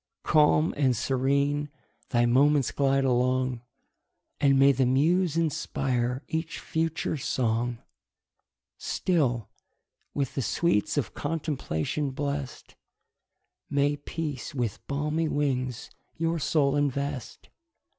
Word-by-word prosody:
Calm 155 +1 +4
and 130 -5 +2
serene 140 +3 +1 0.4
thy 120 -1 +3
moments 140 +3 +3
glide 135 -1 +2
along, 130 -1 +1 0.8
And 140 -1 +4
may 135 +1 +7
the 130 -1 +2
muse 165 +6 +2
inspire 135 -5 -1
each 160 0 -3
future 160 -1 -2
song! 120 -2 -1 1.0
Still, 130 - 0 0.7
with 140 -3 -1
the 135 - -1
sweets 125 0 +1
of 145 - -1
contemplation 145 - -2
bless'd, 140 -1 -4 1.0
May 145 0 +2
peace 145 0 -5
with 115 -4 -2
balmy 150 +3 -1
wings 130 -5 -1 0.3
your 165 0 0
soul 145 -2 +2
invest! 140 -2 -2
140 Hz, 100 wpm, -27 LUFS, 130-150 Hz, 1.0 s, may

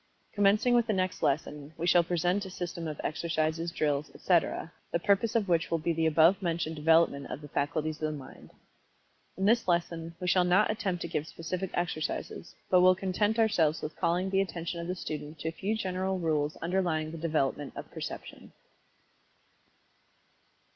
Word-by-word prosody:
Commencing 205 +4 +3
with 240 -1 +3
the 215 - +1
next 185 -1 -1
lesson, 145 +1 -1
we 165 - -2
shall 175 0 +6
present 175 +3 0
a 190 - -7
system 175 -2 -5
of 150 -2 -5
exercises, 165 +1 -1
drills, 150 -2 0
etc., 170 -1 +1 0.2
the - - +2
purpose 200 +6 +1
of 215 -3 +2
which 170 -2 +1
will 165 - +1
be 165 +1 -1
the 160 0 +1
above 165 +5 +5
mentioned 165 -2 -1
development 155 -2 +3
of - - -5
the 150 - -10
faculties 150 +2 -1
of 155 0 0
the 150 - -5
Mind. 135 - -12 0.9
In 190 - 0
this 230 +1 +3
lesson 170 -1 -1
we 180 - -5
shall 180 0 +4
not 180 +5 +4
attempt 190 -5 -2
to - - -3
give 155 -2 -3
specific 180 +4 -4
exercises, 170 0 -3 0.2
but 180 -1 +6
will 185 0 +6
content 195 +4 0
ourselves 175 -9 +2
with 155 - -5
calling 180 +3 0
the 195 0 +3
attention 170 -2 -4
of 170 - -5
the 180 - -2
student 155 -3 -6
to 160 +2 -3
a - - -4
few 200 +6 -2
general 190 -2 -1
rules 155 -3 0
underlying 165 -3 0
the 165 - -7
development 145 -3 -1
of - - -8
Perception. - - -8
170 Hz, 180 wpm, -29 LUFS, 155-185 Hz, 0.9 s, shall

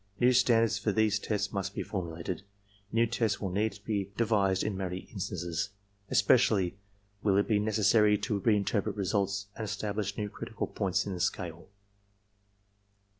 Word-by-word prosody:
New 125 +1 +5
standards 115 -3 +4
for 105 +2 0
these 105 -1 +2
tests 100 -1 -2
must 100 0 -3
be - - -2
formulated. 85 -1 -4 0.5
New 115 +1 +3
tests 115 -1 0
will 95 -3 -3
need 105 +3 0
to 100 +1 -15
be 100 -3 -1
de 115 - +3
vised 100 -4 +2
in 105 - -1
many 95 -1 -3
instances. 90 -3 -3 0.4
Especially 100 -3 +3 0.5
will 100 -2 +3
it 100 - +2
be 105 -3 +3
necessary 105 0 +4
to 100 0 -2
reinterpret 105 -1 +1
results 100 0 0
and 110 - -5
establish 105 -1 -3
new 105 - -1
critical 110 +2 -5
points 100 -1 -1
in 100 - -3
the 90 - -5
scale. 85 -1 -2
100 Hz, 160 wpm, -30 LUFS, 95-110 Hz, 0.5 s, New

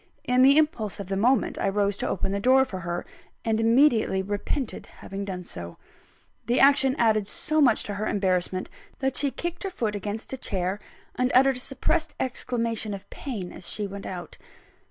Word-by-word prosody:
In 250 0 +3
the 275 +3 +7
impulse 270 - +1
of 195 -2 -6
the 195 - 0
moment, 245 +7 +2
I - - +1
rose 200 0 +1
to - - -2
open 190 - -1
the 200 - -1
door 260 +5 +5
for 190 -8 -6
her; 175 0 -4 0.4
and 220 -1 +1
immediately 225 -4 +4
repented 205 +6 -3
having 195 +1 -7
done 185 -2 -5
so. 85 - -8 0.7
The 240 +2 +2
action 270 -1 +5
added 215 -3 +2
so 310 +8 -1
much 250 -6 +4
to 205 - -5
her 210 +2 -2
embarrassment 185 -2 0 0.3
that 265 -1 -1
she 285 +1 +3
kicked 345 +5 -5
her 390 - -2
foot 225 - -2
against 205 +5 -5
a - - -3
chair, 190 -2 -2 0.3
and 250 0 0
uttered 265 0 +5
a - - -4
suppressed 310 +5 -1
exclamation 230 -4 -2
of 195 - -11
pain 205 -10 -5
as - - -6
she 210 - -2
went 200 0 -7
out. 175 -3 -7
220 Hz, 190 wpm, -26 LUFS, 195-265 Hz, 0.7 s, the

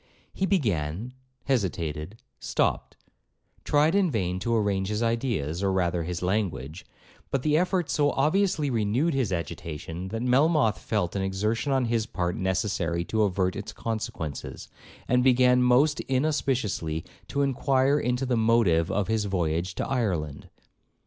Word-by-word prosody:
He 190 - -1
began—hesitated—stopped; 115 - -2 0.7
tried 150 +3 +3
in 195 -3 +3
vain 95 - -1
to 115 +4 0
arrange 100 -3 0
his 105 +3 -1
ideas, 115 - -1
or 100 -1 +1
rather 90 -2 0
his 90 +1 -4
language; 90 -5 -2 0.4
but 135 -2 -1
the 150 -1 +2
effort 180 0 +1
so 145 0 +2
obviously 155 0 +1
renewed 120 +8 +1
his 130 -7 0
agitation, 85 +1 -5
that 115 +4 -4
Melmoth 135 -2 +3
felt 100 -5 -2
an 100 - 0
exertion 105 +7 -1
on 130 -2 +2
his 115 -2 0
part 90 0 -2
necessary 95 -2 -1
to 110 +4 0
avert 95 -2 +1
its 100 - -6
consequences, 110 -9 -5 0.4
and 125 0 +3
began 125 -1 +5
most 130 +5 +4
inauspiciously 130 - 0 0.2
to 140 - 0
inquire 135 +1 +2
into 125 +1 -1
the 125 -1 +1
motive 110 -8 +3
of 100 -2 0
his 110 -1 0
voyage 85 -2 -1
to - - -2
Ireland. 90 - -2
110 Hz, 135 wpm, -26 LUFS, 90-130 Hz, 0.7 s, began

